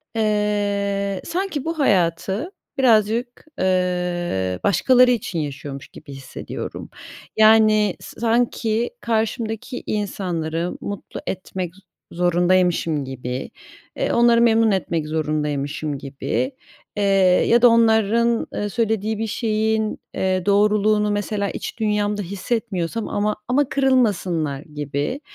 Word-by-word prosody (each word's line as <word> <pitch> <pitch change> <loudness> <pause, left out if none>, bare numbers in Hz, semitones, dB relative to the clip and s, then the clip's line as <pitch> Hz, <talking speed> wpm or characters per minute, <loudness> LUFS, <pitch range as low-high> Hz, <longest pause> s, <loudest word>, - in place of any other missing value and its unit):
eee, 205 -2 0
sanki 350 -5 -3
bu 330 -1 -3
hayatı 190 - +1 0.3
birazcık, 235 0 +2 0.2
ııı, 180 - 0
başkaları 250 - +5
için 205 -8 -2
yaşıyormuş 140 -2 -6
gibi - - -13
hissediyorum. 135 -1 -7 0.5
Yani, 215 -2 +5
sa - - -11
sanki 230 -1 +1
karşımdaki 225 +2 -2
insanları 175 -5 -2
mutlu 205 -1 -6
etmek 185 -2 -4 0.4
zorundaymışım 175 -3 +2
gibi, 130 -1 -5 0.5
eee, - - 0
onları 235 0 +5
memnun 225 -1 +4
etmek 170 -5 -1
zorundaymışım 150 -1 -2
gibi, 140 - -3 0.5
eee, 205 - +1 0.4
ya 235 +1 +4
da 245 - +8
onların, 230 0 +3
eee, 205 - -2
söylediği 220 -1 -1
bir 225 - -1
şeyin, 220 0 0 0.2
eee, 185 -1 0
doğruluğunu, 210 +1 +3
mesela, 205 0 -1
iç - - -6
dünyamda 210 -1 0
hissetmiyorsam 200 0 -3
ama 210 +1 0
ama 275 +2 +2
kırılmasınlar 190 - +1
gibi. 150 - -4
205 Hz, 105 wpm, -21 LUFS, 175-225 Hz, 0.5 s, da